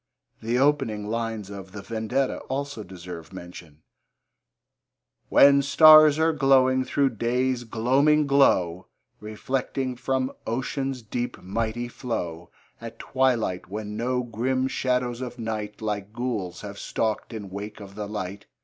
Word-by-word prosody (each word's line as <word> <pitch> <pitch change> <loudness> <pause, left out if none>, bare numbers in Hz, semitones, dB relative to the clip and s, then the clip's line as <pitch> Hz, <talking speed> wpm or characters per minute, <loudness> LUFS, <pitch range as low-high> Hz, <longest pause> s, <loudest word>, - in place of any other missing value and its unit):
The 115 +2 0
opening 135 -7 +1
lines 115 -3 -3
of 95 -2 -9
The 100 - -7
Vendetta 115 +5 -1
also 140 -4 -3
deserve 90 -3 -9
mention: 85 -4 -11 1.5
When 140 0 +7
stars 155 +1 +8
are 160 +1 +3
glowing 130 -2 +4
through 140 0 +1
day's 125 +1 0
gloaming 135 +7 +3
glow, 95 -11 +3 0.3
Reflecting 130 +4 -3
from 130 +1 -1 0.2
ocean's 130 +2 -2
deep, 120 +3 -4
mighty 115 +5 -2
flow, 90 -9 -5 0.3
At 115 0 -8
twilight, 120 -11 0
when 105 +1 -5
no 125 +3 -1
grim 130 +3 -1
shadows 125 -2 -1
of 125 -1 -6
night, 110 -2 -5
Like 105 -1 -3
ghouls, 110 -8 -3
have 100 -1 -8
stalked 110 +1 -2
in 105 -4 -7
wake 100 +3 -7
of 100 -1 -10
the 105 0 -5
light. 100 -2 -6
115 Hz, 130 wpm, -25 LUFS, 105-130 Hz, 1.5 s, stars